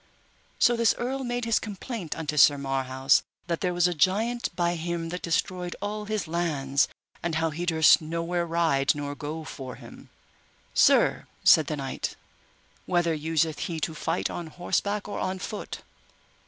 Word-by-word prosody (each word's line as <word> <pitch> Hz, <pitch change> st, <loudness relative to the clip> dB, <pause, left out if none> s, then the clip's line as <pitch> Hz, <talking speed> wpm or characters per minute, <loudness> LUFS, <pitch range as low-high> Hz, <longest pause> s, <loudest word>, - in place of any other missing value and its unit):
So 240 Hz, -, +4 dB
this 230 Hz, -1 st, +3 dB
earl 265 Hz, +2 st, -2 dB
made 245 Hz, -1 st, -2 dB
his 230 Hz, -1 st, +2 dB
complaint 210 Hz, -, -5 dB
unto 155 Hz, -2 st, -3 dB
Sir 145 Hz, -1 st, +6 dB
Marhaus, 135 Hz, 0 st, +2 dB, 0.2 s
that 170 Hz, -1 st, -2 dB
there 180 Hz, -, +1 dB
was 175 Hz, 0 st, +3 dB
a 180 Hz, -, 0 dB
giant 215 Hz, +8 st, +1 dB
by 175 Hz, -1 st, +1 dB
him 170 Hz, 0 st, -3 dB
that 180 Hz, +1 st, -5 dB
destroyed 180 Hz, +1 st, -1 dB
all 210 Hz, +1 st, -4 dB
his 215 Hz, -4 st, -2 dB
lands, 150 Hz, -5 st, +1 dB, 0.3 s
and 170 Hz, -2 st, -2 dB
how 160 Hz, 0 st, +1 dB
he 170 Hz, +3 st, -4 dB
durst 160 Hz, -2 st, +6 dB
nowhere 170 Hz, +2 st, -2 dB
ride 160 Hz, -5 st, +2 dB
nor 145 Hz, -1 st, -4 dB
go 155 Hz, +2 st, -5 dB
for 135 Hz, -5 st, -7 dB
him. -, -, -13 dB, 0.6 s
Sir, -, -, +4 dB, 0.2 s
said 155 Hz, -4 st, +6 dB
the 150 Hz, -, -2 dB
knight, 135 Hz, -1 st, -4 dB, 0.7 s
whether 175 Hz, -2 st, +2 dB
useth 160 Hz, 0 st, 0 dB
he 165 Hz, -2 st, -3 dB
to 160 Hz, -, -1 dB
fight 155 Hz, -, -1 dB
on 170 Hz, -, -5 dB
horseback 200 Hz, +5 st, -2 dB
or 205 Hz, -, -4 dB
on 185 Hz, 0 st, -2 dB
foot? 205 Hz, +2 st, -6 dB
170 Hz, 165 wpm, -27 LUFS, 155-185 Hz, 0.7 s, Sir